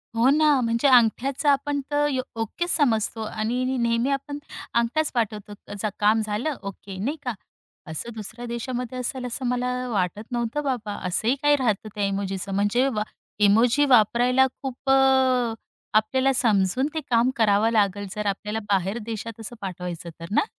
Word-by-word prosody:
हो 235 Hz, +3 st, +4 dB
ना, 300 Hz, -1 st, +4 dB
म्हणजे 230 Hz, +3 st, +1 dB
अंगठ्याचं 255 Hz, +3 st, +3 dB
आपण 285 Hz, +1 st, +1 dB
तर 290 Hz, 0 st, +2 dB
यो 260 Hz, -1 st, 0 dB, 0.2 s
ओकेचं 345 Hz, -, -1 dB
समजतो 225 Hz, -6 st, +1 dB
आणि 225 Hz, +4 st, -2 dB
नी 260 Hz, +1 st, -1 dB
नेहमी 235 Hz, +1 st, +1 dB
आपण 280 Hz, +1 st, -3 dB, 0.3 s
अंगठ्याच 235 Hz, +7 st, +1 dB
पाठवतो. 210 Hz, -3 st, -2 dB, 0.5 s
काम 215 Hz, +2 st, +4 dB
झालं 215 Hz, +8 st, -2 dB
ओके, 195 Hz, 0 st, -8 dB
नाही 290 Hz, +7 st, -2 dB
का. 245 Hz, -, -2 dB, 0.5 s
असं 160 Hz, +9 st, -5 dB
दुसऱ्या 225 Hz, +2 st, -7 dB
देशामध्ये 245 Hz, +1 st, -4 dB
असेल, 250 Hz, +1 st, -3 dB
असं 250 Hz, +1 st, -4 dB
मला 250 Hz, 0 st, 0 dB, 0.2 s
वाटत 205 Hz, -1 st, -1 dB
नव्हतं 240 Hz, +4 st, -1 dB
बाबा. 240 Hz, -6 st, -2 dB
असंही 220 Hz, +7 st, +1 dB
काही 290 Hz, 0 st, +5 dB
राहतं 220 Hz, -6 st, -1 dB
त्या 205 Hz, -1 st, -1 dB
इमोजीचं. 195 Hz, 0 st, -2 dB
म्हणजे 205 Hz, +7 st, +2 dB
वा 215 Hz, -5 st, -1 dB, 0.5 s
इमोजी 240 Hz, +7 st, +4 dB
वापरायला 250 Hz, +1 st, +4 dB, 0.2 s
खूप 270 Hz, 0 st, -4 dB
अ, 265 Hz, -3 st, +4 dB, 0.4 s
आपल्याला 260 Hz, +5 st, +3 dB
समजून 220 Hz, +1 st, +2 dB
ते 315 Hz, -, -1 dB
काम 235 Hz, +1 st, +4 dB
करावं 215 Hz, 0 st, +3 dB
लागलं 205 Hz, -2 st, +1 dB
जर 210 Hz, 0 st, -3 dB
आपल्याला 210 Hz, +2 st, -2 dB
बाहेर 195 Hz, +3 st, +1 dB
देशात 225 Hz, 0 st, -6 dB
असं 225 Hz, +2 st, -8 dB
पाठवायचं 180 Hz, -3 st, -6 dB
तर 165 Hz, -, -6 dB
ना? 210 Hz, -, +3 dB
235 Hz, 155 wpm, -24 LUFS, 210-260 Hz, 0.5 s, काही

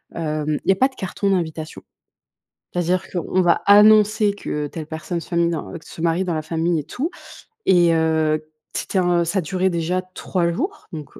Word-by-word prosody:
hem, 155 Hz, -2 st, -1 dB
il -, -, -4 dB
y -, -, +8 dB
a -, -, +3 dB
pas 260 Hz, +8 st, +3 dB
de 270 Hz, -, -19 dB
carton 195 Hz, +1 st, -2 dB
d'invitation. 160 Hz, -4 st, -3 dB, 0.9 s
C'est-à-dire 180 Hz, +1 st, 0 dB
qu'on 185 Hz, +1 st, 0 dB
va 175 Hz, -2 st, +3 dB
annoncer 210 Hz, 0 st, +6 dB
que 150 Hz, -7 st, -4 dB
telle 155 Hz, +1 st, -7 dB
personne 165 Hz, +2 st, -4 dB
se 175 Hz, -, -10 dB
minen 170 Hz, 0 st, +2 dB, 0.2 s
heu, -, -, -6 dB
se -, -, -10 dB
marie 170 Hz, +2 st, +1 dB
dans 180 Hz, -, -2 dB
la 155 Hz, -, -1 dB
famille 165 Hz, +1 st, 0 dB
et -, -, -4 dB
tout, 265 Hz, -, -3 dB, 0.6 s
et, 175 Hz, -2 st, +5 dB
heu, 160 Hz, -1 st, +1 dB, 0.3 s
c'était 190 Hz, -, -1 dB
un 175 Hz, -1 st, +2 dB
ça 190 Hz, +3 st, 0 dB
durait 185 Hz, +3 st, 0 dB
déjà 175 Hz, +1 st, -1 dB
3 175 Hz, -2 st, -1 dB
jours 365 Hz, -, -4 dB
donc, 150 Hz, -3 st, -7 dB
170 Hz, 190 wpm, -21 LUFS, 160-190 Hz, 0.9 s, y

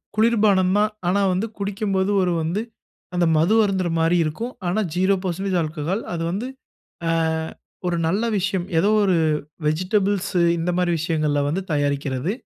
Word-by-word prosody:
குளிர்பானம் 210 Hz, -4 st, +3 dB
தான். 210 Hz, +1 st, +2 dB, 0.2 s
ஆனா, 200 Hz, +3 st, +2 dB
வந்து 190 Hz, +5 st, -1 dB
குடிக்கும்போது 200 Hz, -1 st, -1 dB
ஒரு 180 Hz, -1 st, +1 dB
வந்து 170 Hz, +6 st, -1 dB, 0.5 s
அந்த 175 Hz, -1 st, +2 dB
மது 170 Hz, +8 st, +3 dB
அருந்துற 190 Hz, -3 st, 0 dB
மாரி 165 Hz, +2 st, +3 dB
இருக்கும். 225 Hz, +12 st, -4 dB
ஆனா 185 Hz, +5 st, 0 dB, 0.2 s
ஜீரோ 190 Hz, +2 st, +3 dB
பெர்சென்டேஜ் 190 Hz, +1 st, -1 dB
ஆல்கஹால் 160 Hz, +6 st, -2 dB
அது 165 Hz, -, -3 dB
வந்து 210 Hz, +7 st, -3 dB, 0.6 s
அ -, -, +2 dB, 0.7 s
ஒரு 175 Hz, -1 st, 0 dB
நல்ல 200 Hz, +7 st, +1 dB
விஷயம். 190 Hz, -1 st, -1 dB
ஏதோ 200 Hz, +5 st, +3 dB
ஒரு 190 Hz, -3 st, +3 dB, 0.5 s
வெஜிடபிள்ஸ் 190 Hz, +5 st, 0 dB, 0.3 s
இந்த 165 Hz, +2 st, -1 dB
மாரி 175 Hz, -1 st, +1 dB
விஷயங்கள்ல 155 Hz, -3 st, 0 dB
வந்து 185 Hz, +6 st, -1 dB
தயாரிக்கிறது. 140 Hz, +1 st, -1 dB
185 Hz, 145 wpm, -22 LUFS, 165-200 Hz, 0.7 s, குளிர்பானம்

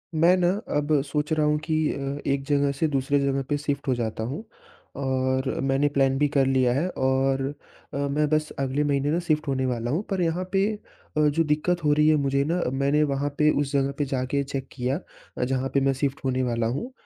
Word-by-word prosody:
मैं 170 Hz, +3 st, +5 dB
ना, 175 Hz, -1 st, +3 dB, 0.3 s
अब 145 Hz, 0 st, +2 dB
सोच 150 Hz, +2 st, -2 dB
रहा 155 Hz, -1 st, +2 dB
हूँ 150 Hz, 0 st, +2 dB
कि 160 Hz, 0 st, -2 dB, 0.2 s
अ, 140 Hz, 0 st, -4 dB
एक 140 Hz, 0 st, 0 dB
जगह 140 Hz, 0 st, +2 dB
से 160 Hz, -, +3 dB
दूसरे 140 Hz, 0 st, +1 dB
जगह 140 Hz, 0 st, 0 dB
पे 145 Hz, -, +1 dB
शिफ्ट 145 Hz, -1 st, -3 dB
हो 130 Hz, -, +3 dB
जाता 110 Hz, -2 st, -3 dB
हूँ, 135 Hz, -, -4 dB, 0.5 s
और 130 Hz, -1 st, 0 dB, 0.2 s
मैंने 135 Hz, +1 st, +2 dB
प्लान 135 Hz, -2 st, +2 dB
भी 145 Hz, +1 st, +3 dB
कर 135 Hz, -1 st, +4 dB
लिया 130 Hz, -2 st, +2 dB
है 145 Hz, +8 st, 0 dB, 0.2 s
और 135 Hz, 0 st, +2 dB, 0.5 s
अ, -, -, -3 dB
मैं 140 Hz, +2 st, 0 dB
बस 155 Hz, 0 st, +1 dB
अगले 135 Hz, +2 st, 0 dB
महीने 145 Hz, 0 st, +1 dB
ना 165 Hz, -, +1 dB
शिफ्ट 155 Hz, -1 st, +1 dB
होने 130 Hz, -1 st, 0 dB
वाला 120 Hz, -1 st, -2 dB
हूँ। 160 Hz, +7 st, 0 dB
पर 195 Hz, -3 st, -1 dB
यहाँ 170 Hz, +1 st, 0 dB
पे 195 Hz, 0 st, +3 dB, 0.5 s
अ, -, -, +3 dB
जो 155 Hz, +3 st, +2 dB
दिक्कत 160 Hz, +3 st, 0 dB
हो 150 Hz, -1 st, +4 dB
रही 150 Hz, +1 st, +3 dB
है 155 Hz, -, +5 dB
मुझे 140 Hz, -1 st, +1 dB
ना 175 Hz, +1 st, 0 dB
मैंने 140 Hz, +3 st, +2 dB
वहाँ 140 Hz, +1 st, -1 dB
पे 150 Hz, 0 st, +4 dB
उस 140 Hz, -1 st, -2 dB
जगह 140 Hz, -1 st, +2 dB
पे 145 Hz, -, 0 dB
जाके 135 Hz, +1 st, -1 dB
चेक 135 Hz, -1 st, -5 dB
किया 130 Hz, +3 st, -2 dB, 0.4 s
अ, -, -, 0 dB
जहाँ 130 Hz, +1 st, -1 dB
पे 140 Hz, -, +4 dB
मैं 135 Hz, 0 st, +2 dB
शिफ्ट 140 Hz, -1 st, 0 dB
होने 130 Hz, 0 st, +1 dB
वाला 115 Hz, -2 st, 0 dB
हूँ, 245 Hz, -, -5 dB
140 Hz, 225 wpm, -25 LUFS, 135-150 Hz, 0.5 s, मैं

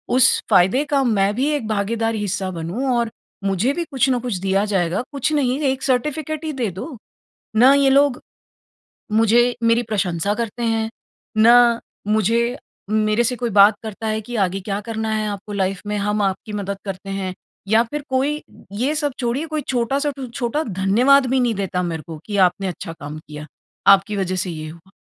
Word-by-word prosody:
उस 260 Hz, +1 st, +5 dB
फायदे 195 Hz, +7 st, +4 dB
का 280 Hz, -2 st, +1 dB
मैं 205 Hz, -4 st, +2 dB
भी 265 Hz, +4 st, +1 dB
एक 225 Hz, -7 st, -3 dB
भागीदार 225 Hz, +2 st, -1 dB
हिस्सा 205 Hz, -2 st, -2 dB
बनूँ 175 Hz, +10 st, -4 dB
और 235 Hz, -1 st, 0 dB, 0.3 s
मुझे 200 Hz, +8 st, +1 dB
भी 345 Hz, -, -2 dB
कुछ 270 Hz, 0 st, +2 dB
न 250 Hz, -, +2 dB
कुछ 240 Hz, -4 st, -3 dB
दिया 195 Hz, +2 st, +1 dB
जाएगा, 190 Hz, -2 st, 0 dB
कुछ 280 Hz, +2 st, -1 dB
नहीं 275 Hz, -2 st, +1 dB
1 265 Hz, 0 st, -5 dB
सर्टिफिकेट 300 Hz, +4 st, -1 dB
ही 310 Hz, -, -2 dB
दे 245 Hz, -5 st, -1 dB
दो। 230 Hz, -, -7 dB, 0.6 s
ना 255 Hz, +4 st, +7 dB
ये 280 Hz, -1 st, +4 dB
लोग, 275 Hz, -1 st, +3 dB, 0.9 s
मुझे 230 Hz, +3 st, +3 dB
मेरी 230 Hz, +1 st, +3 dB
प्रशंसा 200 Hz, -3 st, -1 dB
करते 235 Hz, +1 st, -4 dB
हैं, 225 Hz, -1 st, 0 dB, 0.5 s
ना 235 Hz, +1 st, +6 dB, 0.3 s
मुझे 230 Hz, +4 st, +1 dB, 0.3 s
मेरे 215 Hz, +2 st, +2 dB
से 250 Hz, +2 st, 0 dB
कोई 240 Hz, -1 st, -2 dB
बात 205 Hz, +1 st, +7 dB
करता 220 Hz, 0 st, -5 dB
है 215 Hz, 0 st, 0 dB
कि 240 Hz, +3 st, -7 dB
आगे 190 Hz, +1 st, 0 dB
क्या 200 Hz, +1 st, -3 dB
करना 220 Hz, 0 st, -4 dB
है, 215 Hz, 0 st, -1 dB
आपको 205 Hz, +1 st, -6 dB
लाइफ 195 Hz, -1 st, -1 dB
में, 210 Hz, 0 st, -1 dB
हम 210 Hz, +1 st, 0 dB
आपकी 200 Hz, +2 st, -2 dB
मदद 200 Hz, -1 st, -3 dB
करते 195 Hz, 0 st, -6 dB
हैं 195 Hz, -1 st, -3 dB, 0.3 s
या 220 Hz, +2 st, +4 dB
फिर 295 Hz, -1 st, -3 dB
कोई, 280 Hz, +3 st, 0 dB, 0.3 s
ये 250 Hz, +9 st, -1 dB
सब 295 Hz, -3 st, -1 dB
छोड़िए 250 Hz, +5 st, -1 dB
कोई 310 Hz, -1 st, -2 dB
छोटा-सा 270 Hz, +4 st, 0 dB
टू 265 Hz, -, -5 dB
छोटा 240 Hz, +5 st, -2 dB
धन्यवाद 230 Hz, -, +3 dB
भी 265 Hz, -, +3 dB
नहीं 240 Hz, -2 st, +2 dB
देता 185 Hz, -2 st, -2 dB
मेरे 165 Hz, -3 st, -3 dB
को, 160 Hz, -2 st, -7 dB
कि 205 Hz, -2 st, -3 dB
आपने 190 Hz, +1 st, +3 dB
अच्छा 175 Hz, -1 st, -6 dB
काम 145 Hz, +1 st, -7 dB
किया, 150 Hz, 0 st, -8 dB, 0.5 s
आपकी 195 Hz, +2 st, +1 dB
वजह 185 Hz, -1 st, -1 dB
से 180 Hz, -, -4 dB
ये 155 Hz, -2 st, -6 dB
हुआ। 170 Hz, +4 st, -15 dB
220 Hz, 190 wpm, -21 LUFS, 195-250 Hz, 0.9 s, ना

